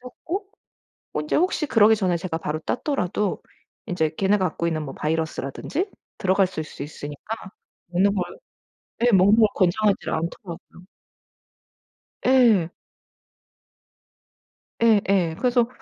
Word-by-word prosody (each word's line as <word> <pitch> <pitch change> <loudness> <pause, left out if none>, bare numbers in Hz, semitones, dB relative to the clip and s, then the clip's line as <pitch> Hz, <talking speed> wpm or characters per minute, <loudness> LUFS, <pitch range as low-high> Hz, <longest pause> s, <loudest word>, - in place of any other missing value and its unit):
썩고 335 +10 -6 0.8
인제 150 - -2
혹시 330 -3 +1
그러기 220 -2 +5
전에 185 -4 0
제가 165 -1 -3
바로 155 0 -3
땄더라도 205 - -1 0.4
인제 160 -3 -1
걔네가 190 -2 +2
갖고 170 - -4
있는 155 -2 -1
뭐 135 - -7
바이러스라든지 160 - -2 0.3
들어갔을 185 -3 +1
수 150 - -11
있으니까 150 +7 -6 0.5
먹는 190 +3 +2
걸 180 - +1 0.8
네. 240 0 +3
먹는 195 +3 +6
걸 215 -2 +6
권장하지를 200 +2 +1
않더라고요. 170 +2 -6 1.4
예. 235 -10 +5 2.1
예예. 195 -7 +3
그래서 245 -2 +2
190 Hz, 260 characters per minute, -24 LUFS, 165-225 Hz, 2.1 s, 먹는